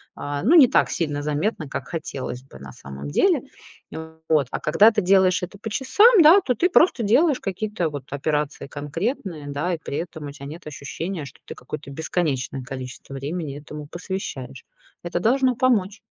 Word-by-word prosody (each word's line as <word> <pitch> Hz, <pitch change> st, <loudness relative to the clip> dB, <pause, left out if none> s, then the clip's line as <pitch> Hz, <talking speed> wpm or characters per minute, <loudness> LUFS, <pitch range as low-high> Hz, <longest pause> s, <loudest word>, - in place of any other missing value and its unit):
а, 145 Hz, +1 st, -4 dB
ну, 285 Hz, -, +5 dB
не 290 Hz, -7 st, +9 dB
так 255 Hz, -, +2 dB
сильно 145 Hz, -4 st, -2 dB
заметна, 150 Hz, +3 st, -1 dB
как 135 Hz, -1 st, -5 dB
хотелось 135 Hz, -6 st, -5 dB
бы 135 Hz, -, -14 dB
на 70 Hz, 0 st, -10 dB
самом 70 Hz, +1 st, -9 dB
деле. 70 Hz, -, +3 dB, 0.9 s
Вот. 150 Hz, -4 st, +3 dB
А -, -, -2 dB
когда 200 Hz, +9 st, +5 dB
ты 215 Hz, -1 st, 0 dB
делаешь 185 Hz, -1 st, +4 dB
это 180 Hz, +3 st, -6 dB
по 220 Hz, +2 st, -6 dB
часам, 400 Hz, -, +5 dB
да, 330 Hz, +6 st, +8 dB
то 255 Hz, -, 0 dB
ты 345 Hz, -, +1 dB
просто 330 Hz, -7 st, +4 dB
делаешь 265 Hz, +7 st, +3 dB
какие-то 195 Hz, -2 st, -2 dB
вот 145 Hz, -2 st, -6 dB
операции 150 Hz, 0 st, -2 dB
конкретные, 160 Hz, -, -4 dB
да. 145 Hz, +6 st, -2 dB
И 165 Hz, -, -3 dB
при 140 Hz, -, -4 dB
этом 160 Hz, -3 st, -5 dB
у -, -, -6 dB
тя 140 Hz, -1 st, -10 dB
нет 155 Hz, +3 st, -9 dB
ощущения, 155 Hz, +4 st, -5 dB
что 130 Hz, -, -13 dB
ты -, -, -8 dB
какое-то 140 Hz, +3 st, -8 dB
бесконечное 140 Hz, -3 st, -2 dB
количество 130 Hz, +1 st, -8 dB
времени 145 Hz, +1 st, -4 dB
этому 150 Hz, 0 st, -9 dB
посвящаешь. 150 Hz, -8 st, -6 dB, 0.4 s
Это 175 Hz, 0 st, -2 dB
должно 255 Hz, +5 st, +2 dB
помочь. 220 Hz, -5 st, +1 dB
160 Hz, 180 wpm, -23 LUFS, 140-210 Hz, 0.9 s, не